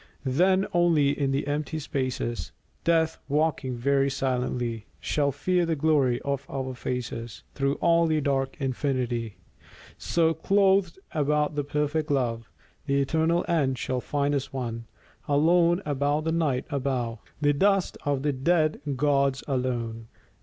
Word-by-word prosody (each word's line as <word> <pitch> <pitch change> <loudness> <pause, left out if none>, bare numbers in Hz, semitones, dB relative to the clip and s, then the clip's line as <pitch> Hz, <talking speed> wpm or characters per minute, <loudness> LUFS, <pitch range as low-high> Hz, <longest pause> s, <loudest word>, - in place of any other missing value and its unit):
Then 185 +9 +3
only 165 -5 +4
in 140 -1 -1
the 135 +1 0
empty 150 +2 -2
spaces, 130 -5 -3 0.3
Death, 165 -1 +2
walking 145 -3 0
very 140 +2 +2
silently, 125 -4 -2
Shall 145 -2 0
fear 180 +6 +1
the 165 -1 0
glory 140 -5 +2
of 140 -1 -2
our 130 -1 -3
faces 120 -2 -5
Through 140 0 0
all 170 -1 +3
the 155 -1 +2
dark 135 -2 -1
infinity. 125 -5 -2 0.6
So, 165 -1 +2
clothed 195 +1 +2
about 150 0 +1
with 145 -1 -3
perfect 150 +1 0
love, 120 -5 -1 0.4
The 140 0 +2
eternal 160 +5 +1
end 140 -6 +1
shall 125 +1 -2
find 145 +1 0
us 140 -1 -2
one, 115 -4 -4 0.4
Alone 170 +5 +3
above 145 +1 0
the 160 - 0
Night, 155 -6 0
above 130 -4 -2 0.2
The 145 -1 +3
dust 195 +5 +2
of 140 -2 -1
the 145 -1 +1
dead 155 +3 +1
gods, 140 -1 +1
alone. 120 -4 -2
140 Hz, 140 wpm, -26 LUFS, 130-160 Hz, 0.6 s, only